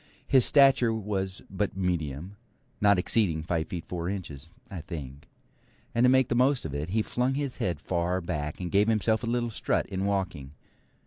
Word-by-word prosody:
His 130 -3 +5
stature 135 -4 +5
was 100 -3 -3
but 95 0 -3
medium, 85 -1 -2 0.5
not 100 -1 +5
exceeding 90 -4 +1
five 80 -1 -1
feet 85 -3 -6
four 85 -1 -3
inches, 80 -7 -6 0.2
I 90 -4 -7
think; 70 -5 -8 0.6
and 120 - +2
to - - +6
make 130 -1 +4
the - - -1
most 130 - +2
of 75 - -5
it, 75 +3 -3
he 110 +3 +1
flung 125 +4 0
his 140 -3 -3
head 85 -5 -1
far 90 +2 -1
back, 75 -4 -4
and 90 -2 -4
gave 100 +2 +3
himself 110 0 +2
a - - -2
little 120 0 -1
strut - - 0
in 95 0 -3
walking. 90 -9 -2
95 Hz, 185 wpm, -28 LUFS, 85-115 Hz, 0.6 s, to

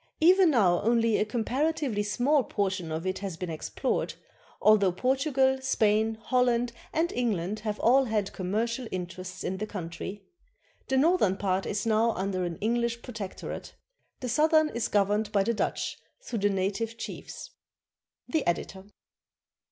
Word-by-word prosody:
Even 360 +2 +6
now 190 - +3
only 230 -1 +3
a - - +1
comparatively 250 +2 -1
small 255 +7 +2
portion 190 -6 -2
of 160 +3 -3
it 185 0 -1
has 190 -4 -5
been 180 -1 -4
explored, 155 - -2 0.4
although 210 -3 +5
Portugal, 265 - +1
Spain, 220 -3 +2
Holland, 245 0 +1 0.2
and 335 +2 0
England 215 -4 -1
have 210 -1 -3
all 265 +3 +4
had 215 -4 -1
commercial 225 +6 -2
interests 185 0 -6
in 190 - -2
the 215 +2 -4
country. 190 +1 -6 0.6
The 265 - +1
northern 275 - +3
part 190 -1 0
is 205 +2 -2
now 225 +1 +3
under 190 -1 -2
an 170 -2 -4
EngHsh 235 +1 0
protectorate; 220 -6 -7 0.5
the 255 - -3
southern 310 +4 +4
is 235 -4 -2
gov 200 -1 +3
erned 210 0 0
by 200 -2 +3
the 235 - 0
Dutch 215 - -2 0.2
through 245 - -4
the 205 +1 +2
native 200 +4 -1
chiefs. - - -7 0.8
The 315 -3 0
Editor. 190 +2 -2
215 Hz, 150 wpm, -28 LUFS, 195-250 Hz, 0.8 s, Even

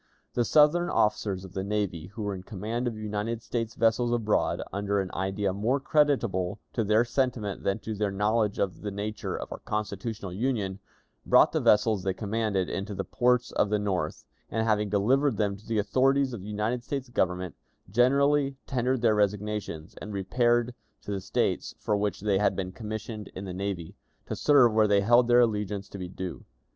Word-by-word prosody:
The 120 - +1
Southern 155 +6 +4
officers 105 -3 0
of 95 - -12
the 95 - -3
navy 100 -5 -2
who 105 +3 -7
were 100 -1 -2
in 95 - -6
command 110 +5 -3
of 115 -2 -3
United 110 +2 -3
States 115 -2 -3
vessels 115 +1 +2
abroad, 115 -3 +1
under 100 0 0
an 95 -1 -3
idea 95 0 -1
more 115 +8 +1
creditable 125 - +1 0.2
to 115 - 0
their 110 +3 +3
sentiment 120 -5 -1
than 100 - 0
to 110 - -4
their 105 0 -1
knowledge 105 +1 +1
of 95 -2 -2
the 105 - -3
nature 105 +2 -4
of - - -7
our - - -6
constitutional 105 -2 -4
Union, 100 -3 -1 0.4
brought - - +5
the - - +1
vessels 105 -1 +4
they 95 0 -1
commanded 105 -3 -1
into 100 +1 -4
the 95 - -2
ports 125 +1 +1
of 105 - +1
the 105 - +2
North, 95 -6 -2 0.2
and, 110 0 -1
having 105 -2 +1
delivered 125 +5 +2
them 100 -2 0
to 100 +3 -16
the 115 -1 -1
authorities 130 +6 +2
of 110 - -6
the 100 - -8
United 110 +4 -1
States 135 +1 -4
Government, 90 -6 -1 0.3
generally 140 +5 +3
tendered 130 -1 0
their 110 -2 +5
resignations, 105 -5 -1
and 105 - -6
repaired 120 +5 +1 0.3
to - - -5
the 100 -1 -2
States - - -1
from 105 -1 0
which 105 -1 -1
they 100 -2 +2
had 105 - +2
been 95 -1 -3
commissioned 110 0 -6
in 95 - -6
the 95 - -5
navy, 95 -3 -4 0.3
to - - -4
serve 135 -6 +5
where 110 -1 +4
they 100 -1 +4
held 120 +4 +5
their 120 0 +6
allegiance 105 -3 -1
to 100 - -8
be 90 - -4
due. 95 -1 -6
105 Hz, 190 wpm, -28 LUFS, 100-120 Hz, 0.4 s, their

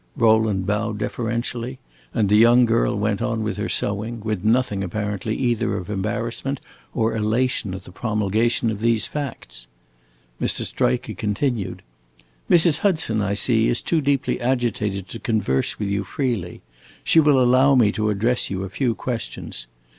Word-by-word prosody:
Rowland 110 -5 +3
bowed 105 +2 -1
deferentially, 120 +3 -3 0.3
and 110 -3 +1
the 105 - +3
young 120 +3 +6
girl 115 -3 +1
went 105 +1 -1
on 115 -2 -1
with 105 -1 -3
her 105 +2 -2
sewing, 105 +3 -2
with 105 -3 -3
nothing, 110 -3 +1
apparently, 105 +2 -3
either 120 -5 0
of 95 +1 -6
embarrassment 115 +7 -3 0.4
or 115 -2 +1
elation 110 -2 0
at 95 - -8
the - - -12
promulgation 110 +3 0
of 105 - -5
these 115 0 +2
facts. 60 - -6 0.7
Mr. - - 0
Striker 60 - -1
continued: 105 -2 -2 0.7
"Mrs. 165 -2 +5
Hudson, 160 - +1
I 100 0 0
see, 110 +2 +2
is 120 - +1
too 165 -2 0
deeply 140 -2 0
agitated 115 -6 -1
to 115 - -7
converse 105 - 0
with 105 - -2
you 100 0 -1
freely. 105 -5 -3 0.4
She 165 - +4
will 145 -3 +5
allow 130 +2 +5
me 115 -5 +4
to 110 0 -1
address 115 +4 0
you 95 -1 -3
a 95 - -5
few 120 +3 -1
questions. 115 - -5
110 Hz, 155 wpm, -22 LUFS, 105-125 Hz, 0.7 s, young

